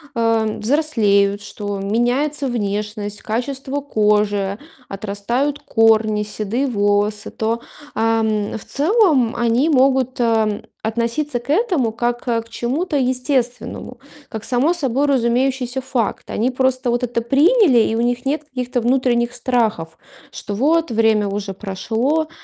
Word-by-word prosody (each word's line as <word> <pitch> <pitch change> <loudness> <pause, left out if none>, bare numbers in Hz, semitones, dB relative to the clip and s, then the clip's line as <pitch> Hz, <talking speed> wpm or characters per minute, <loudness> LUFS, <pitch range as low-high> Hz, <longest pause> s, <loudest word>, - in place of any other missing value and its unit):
э, 225 -2 +1
взрослеют, 210 -7 +2
что 205 -1 -5
меняется 245 +8 0
внешность, 210 -2 -3
качество 265 +5 -3
кожи, 210 -5 +1 0.3
отрастают 215 +8 -2
корни, 225 -5 +3
седые 215 +5 -2
волосы, 205 -2 0
то, 225 +1 -2 0.3
ам, 220 -2 0
в - - -13
целом 305 - +2
они 240 +6 +2
могут, 265 -2 +2
э, - - +3
м, 220 -3 +1 0.2
относиться 235 +5 -1
к 240 - -17
этому 320 - +1
как, 240 +1 -2
э, 230 -1 +1
к 225 - -16
чему-то 265 +9 -2
естественному, 255 -1 -2 0.3
как 220 -1 -6
само 265 +7 +2
собой 280 -4 0
разумеющийся 255 0 0
факт. 255 -3 -2
Они 240 +4 0
просто 255 0 0
вот 240 +1 0
это 240 -1 -1
приняли, 285 - +4
и 220 - +1
у 230 - 0
них 245 +1 -1
нет 300 +3 -1
каких-то 255 -3 -3
внутренних 240 -1 +1
страхов, 220 -12 -1 0.3
что 205 - -6
вот, 320 +8 +2
время 220 -2 +2
уже 200 0 -4
прошло. 225 +11 -1
235 Hz, 130 wpm, -19 LUFS, 215-265 Hz, 0.3 s, приняли